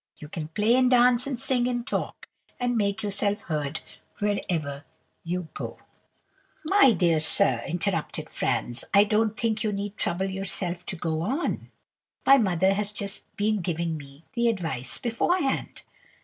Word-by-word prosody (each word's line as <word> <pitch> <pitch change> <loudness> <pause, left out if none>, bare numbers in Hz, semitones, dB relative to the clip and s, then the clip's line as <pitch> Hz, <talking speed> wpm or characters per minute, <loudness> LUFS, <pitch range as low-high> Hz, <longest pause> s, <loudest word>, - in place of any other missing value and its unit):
You 150 - -10
can 155 -1 -5
play, 210 +8 +1
and 255 0 +4
dance, 250 0 +5
and 265 -4 -3
sing, 250 -2 +2
and 240 -1 -2
talk, - - -3 0.3
and 245 0 0
make 205 -1 0
yourself 205 0 0
heard 150 -1 -3 0.4
wherever 165 -8 -2 0.4
you 175 -1 -3
go.' - - -6 0.9
"'My 315 - +6
dear 170 -4 +2
sir,' 130 -6 +5
interrupted 175 -1 -2
Franz, 120 0 -2
'I 200 - +8
don't 215 +1 0
think 220 -2 0
you 215 - 0
need 200 +1 -4
trouble 175 +2 -1
yourself 190 -2 -3
to - - -3
go 160 -2 -2
on. 265 - -2 0.6
My 275 0 +7
mother 190 -3 +2
has 205 +1 -1
just 200 -1 -3
been 210 -1 +1
giving 170 -1 -2
me 140 +1 -12
the 235 -1 +1
advice 165 - -1
beforehand. 270 +6 -1
200 Hz, 150 wpm, -26 LUFS, 170-230 Hz, 0.9 s, I